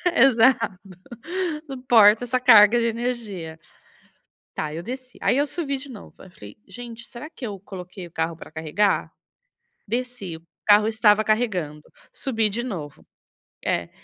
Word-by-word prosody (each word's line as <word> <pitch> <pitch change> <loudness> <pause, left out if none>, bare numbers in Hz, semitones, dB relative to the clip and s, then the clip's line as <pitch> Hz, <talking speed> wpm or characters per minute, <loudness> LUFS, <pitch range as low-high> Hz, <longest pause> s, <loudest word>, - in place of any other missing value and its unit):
exato, 235 - +4 0.9
suporta 240 -4 +5
essa 255 +1 0
carga 225 -2 +7
de 230 - +1
energia. 225 -9 -4 1.0
Tá, 155 -1 -2
eu 165 +2 -6
desci, 255 +3 -8
aí - - +2
eu 290 - +2
subi 280 -3 -2
de 275 +1 -10
novo, 215 - -12
aí - - -13
eu 180 - -18
falei: 105 - -13
"Gente, 235 -1 -9
será 240 +5 -9
que 310 -5 -9
eu 205 -4 -6
coloquei 185 -1 -9
o 170 - -14
carro 160 +1 -2
pra - - -12
carregar?", 160 +6 0 0.8
desci, 240 -6 -4
o 160 +1 -15 0.2
carro 210 0 +6
estava 215 -1 +3
carregando, 190 -10 -1 0.3
subi 225 -5 -1
de 225 +4 -3
novo, 170 - -7 0.6
é, - - -1
220 Hz, 150 wpm, -23 LUFS, 185-245 Hz, 1.0 s, carga